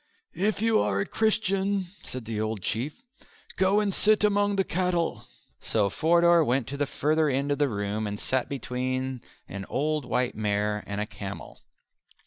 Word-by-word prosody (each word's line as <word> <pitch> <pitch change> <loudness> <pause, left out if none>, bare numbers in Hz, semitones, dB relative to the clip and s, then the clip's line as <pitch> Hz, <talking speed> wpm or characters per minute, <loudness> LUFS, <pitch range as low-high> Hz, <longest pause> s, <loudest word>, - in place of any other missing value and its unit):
"If 210 +3 0
you 225 -1 +4
are 100 -1 +1
a 100 - 0
Christian," 200 -3 +1
exclaimed 125 -3 -7
the 110 -1 -3
old 110 -3 -3
Chief, 130 +7 -2 0.6
"go 190 +2 +3
and 205 -2 0
sit 215 +2 +3
among 205 -1 +3
the 195 - +2
cattle!" 180 -2 -1 0.3
So 100 -3 0
Forder 170 +3 +4
went 130 -2 +1
to 140 - -4
the 145 0 0
further 155 +2 +1
end 140 +2 0
of 145 - 0
the 145 -2 +3
room 105 0 -2
and 105 0 -4
sat 130 -1 -1
between 130 -1 -3 0.3
an 100 0 -6
old 150 0 0
white 125 -1 0
mare 105 0 -1
and 100 0 -3
a 105 - 0
camel. 100 -2 -8
140 Hz, 170 wpm, -27 LUFS, -, 0.6 s, you